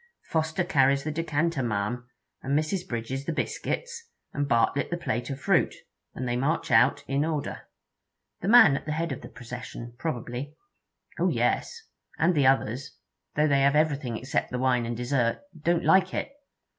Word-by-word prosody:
'Foster 160 +2 0
carries 140 -4 +3
the 155 - -2
decanter, 165 -1 0
ma'am, 120 +2 -2 0.3
and 140 +2 0
Mrs. 175 +4 -1
Bridges 130 +4 -4
the 165 - -1
biscuits, 470 - -3 0.2
and 145 0 -1
Bartlett 130 +3 +2
the 175 - -2
plate 120 -7 -3
of 135 -1 -4
fruit, - - +2 0.4
and 125 - -3
they 120 - 0
march 135 +4 0
out 120 +4 +4
in 140 +2 +1
order.' 155 -3 -3 0.7
'The 180 - -3
man 215 -10 +8
at 140 - -5
the 150 - -1
head 165 +1 -2
of - - -5
the - - -10
procession, 120 -1 -8
probably.' 130 -1 -4 0.6
'Oh - - +3
yes. 460 -1 0 0.3
And 175 +3 +3
the 145 -5 +3
others, 135 +1 0 0.4
though 150 +1 +3
they 140 -2 +3
have 140 +1 +4
everything 145 -6 +1
except 130 +5 -2
the 125 - -3
wine 125 -2 +1
and 120 -1 -3
dessert, 120 -1 0 0.2
don't 170 0 +1
like 190 0 +4
it. - - -3
140 Hz, 170 wpm, -27 LUFS, 125-160 Hz, 0.7 s, man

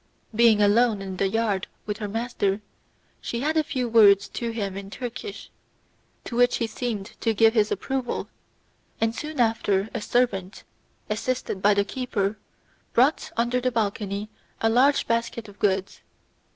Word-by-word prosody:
Being 220 -2 +5
alone 215 +1 +4
in 190 -1 -6
the 195 - +2
yard 210 -3 0 0.2
with 210 -1 -3
her 210 - -4
master, 210 -2 -1 0.6
she 235 - -3
said 310 +3 0
a 315 - +3
few 260 -5 -2
words 205 -4 +6
to 235 - -4
him 205 -4 -3
in 195 0 -7
Turkish, 250 - -7 0.7
to 235 - -6
which 245 +1 +4
he 230 - 0
seemed 220 -2 -4
to 225 -2 0
give 225 +1 +5
his 215 -2 +2
approval, 260 +5 -2 0.7
and 225 0 +1
soon 305 +2 -6
after 220 -3 +1
a 230 - -3
servant, 210 -4 0 0.4
assisted 215 -2 -2
by 205 +1 +4
the 200 0 +2
keeper, 210 -5 -2 0.5
brought 265 +6 +3
under 240 +2 +1
the 255 0 +1
balcony 205 -2 -2 0.3
a 225 - +2
large 270 +5 +4
basket 230 -1 -1
of 205 -1 -15
goods. 195 -1 0
225 Hz, 155 wpm, -25 LUFS, 200-245 Hz, 0.7 s, words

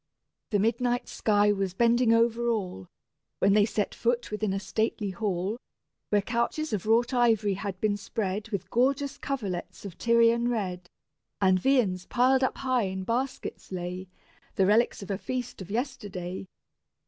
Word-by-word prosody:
The 210 - +2
midnight 240 +4 +1
sky 210 -1 +2
was 195 -2 -1
bending 235 +1 +4
over 230 +1 +3
all, 185 - -3 0.5
When 195 +1 +3
they 205 0 +5
set 210 -2 -1
foot 240 -1 -1
within 210 -1 -1
a 195 - -1
stately 215 0 -1
hall, 200 +1 -2 0.5
Where 205 -1 +2
couches 235 +6 -1
of 210 0 -2
wrought 235 +3 +3
ivory 225 -5 +3
had 195 -1 -5
been 205 -1 +1
spread 205 +1 -3
With 200 -5 -4
gorgeous 275 +3 +1
coverlets 205 -10 -4
of 190 -4 -8
Tyrian 235 0 +4
red, 185 -7 -3 0.5
And 190 -2 +4
viands 200 -7 +1
piled 260 +2 +3
up 260 - 0
high 255 -4 +1
in 190 0 -4
baskets 250 +2 -3
lay, 180 +1 -5 0.5
The 190 - +3
relics 210 +1 +2
of 195 - -6
a 195 - -2
feast 250 -4 -4
of 185 - -8
yesterday. 205 -7 -4
215 Hz, 155 wpm, -28 LUFS, 195-240 Hz, 0.5 s, they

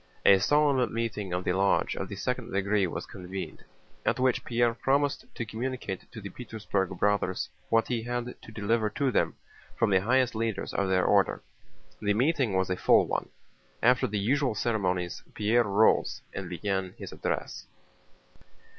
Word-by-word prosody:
A 95 - +8
solemn 140 +2 +3
meeting 115 -4 -3
of 90 +1 -1
the 90 - +1
lodge 95 +1 +2
of - - -4
the - - -5
second - - -3
degree 100 0 +1
was - - -5
convened, 95 +1 -7 0.4
at - - +1
which 130 -1 +2
Pierre 120 -1 +2
promised 140 +3 +1
to 115 - -3
communicate 115 -3 -5
to 115 - -8
the 100 -2 -7
Petersburg 105 -5 -3
Brothers 100 -2 +1 0.2
what 115 0 +3
he 120 -2 -1
had 120 +1 -3
to - - -12
deliver 110 +1 0
to 135 +5 0
them - - +1 0.4
from 115 -3 +2
the 95 -1 +4
highest 125 +4 +2
leaders 115 -1 -2
of 100 -1 0
their 95 -1 +3
order. - - +3 0.6
The 105 -1 +1
meeting 130 - +2
was 95 0 +1
a 90 - 0
full - - +5
one. - - -2 0.5
After 125 +2 +4
the 105 - -2
usual 125 +4 +1
ceremonies 90 -6 -1
Pierre 115 +3 +3
rose 105 +2 +3
and - - -5
began 95 -2 -2
his - - -8
address. - - -4
110 Hz, 165 wpm, -28 LUFS, 95-120 Hz, 0.6 s, A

